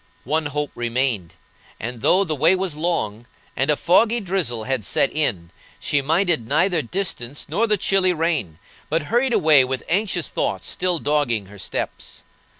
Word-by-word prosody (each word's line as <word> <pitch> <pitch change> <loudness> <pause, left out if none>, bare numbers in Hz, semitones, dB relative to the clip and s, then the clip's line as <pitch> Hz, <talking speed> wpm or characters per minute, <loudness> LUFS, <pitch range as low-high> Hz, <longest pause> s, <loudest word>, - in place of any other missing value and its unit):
One 155 +3 0
hope 145 0 -3
remained, 120 -7 -2 0.4
and, 115 0 -6
though 190 - +4
the 160 -5 -2
way 165 +6 +4
was 185 -3 -2
long, 120 -9 -2 0.3
and 135 - 0
a 150 - +3
foggy 225 +7 +3
drizzle 175 - -1
had 130 -2 -1
set 135 - +1
in, 95 - -1 0.3
she 145 - 0
minded 160 - +1
neither 165 +4 +2
distance 145 - -3
nor 200 +9 +1
the 210 -1 +2
chilly 190 -1 +2
rain, 160 - -1 0.3
but 160 +1 0
hurried 250 +2 +3
away 155 - +5
with 130 0 -3
anxious 185 -1 0
thoughts - - -2
still 180 -1 0
dogging 145 -9 0
her 100 +1 -14
steps. - - -5
150 Hz, 160 wpm, -22 LUFS, 125-180 Hz, 0.4 s, away